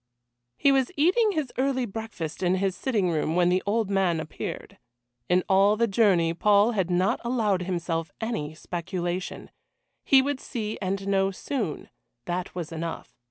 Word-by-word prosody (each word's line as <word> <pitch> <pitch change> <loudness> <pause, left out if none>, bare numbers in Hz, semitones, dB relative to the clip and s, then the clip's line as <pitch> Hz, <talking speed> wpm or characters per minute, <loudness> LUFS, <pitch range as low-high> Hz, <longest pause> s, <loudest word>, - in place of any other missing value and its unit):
He 280 - +4
was 270 +1 +2
eating 395 +8 +3
his 305 -7 -2
early 260 -1 +1
breakfast 210 -8 -6
in 180 0 +2
his 190 -1 0
sitting 205 -5 0
room 160 0 0
when 175 0 +4
the 185 +1 +2
old 215 -1 0
man 185 -4 +2
appeared. 160 -1 -6 0.5
In 180 0 +3
all 200 +2 +4
the 235 - +3
journey 190 -6 +3
Paul 205 +5 +4
had 190 -6 -1
not 180 +2 +1
allowed 220 -6 +1
himself 170 -2 -2
any 190 -10 -3
speculation 175 +2 -4 0.5
he 270 - +6
would 275 0 0
see 220 -5 -4
and 195 +1 -2
know 195 -1 +2
soon, 200 - -4 0.4
that 175 0 -3
was 175 -2 -5
enough. 165 -6 -6
195 Hz, 160 wpm, -26 LUFS, 175-230 Hz, 0.5 s, he